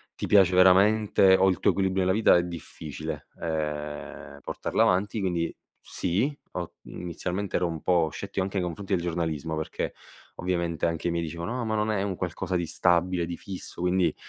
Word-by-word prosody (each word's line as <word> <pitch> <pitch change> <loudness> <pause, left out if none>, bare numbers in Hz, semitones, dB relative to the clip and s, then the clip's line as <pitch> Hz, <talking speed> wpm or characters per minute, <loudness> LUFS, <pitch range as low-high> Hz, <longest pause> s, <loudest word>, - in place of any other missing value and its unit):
ti - - -4
piace 95 -3 +5
veramente 95 +1 +6
o 95 0 +4
il 95 - 0
tuo - - +4
equilibrio 95 -1 +1
nella 95 - +3
vita 110 -4 +5
è 85 - +2
difficile, 80 -3 -6
ehm, 75 -2 -4
portarla - - 0
avanti. 100 +4 +1
Quindi 90 -4 -1 0.3
sì, 110 - -1 0.2
ho 90 -2 -5
inizialmente 90 +3 -3
ero 90 - +1
un 80 -2 -5
po' 85 -3 +2
scettico 100 +2 -4
anche 95 +1 -3
nei 90 - 0
confronti 95 +4 -4
del 85 -2 +1
giornalismo 80 -3 -2
perché 80 - -3 0.4
ovviamente 85 -2 -1
anche 85 +1 -1
i - - 0
miei 85 0 -1
dicevano: 85 +10 -4
"Ah 120 - -2
ma 110 - -1
non 105 0 +1
è 100 -2 0
un 100 -2 -2
qualcosa 90 +1 -3
di 85 -1 0
stabile, 90 +1 +2
di 85 0 -4
fisso, 95 -2 -7
quindi, 90 -2 +2
90 Hz, 185 wpm, -27 LUFS, 85-95 Hz, 0.4 s, veramente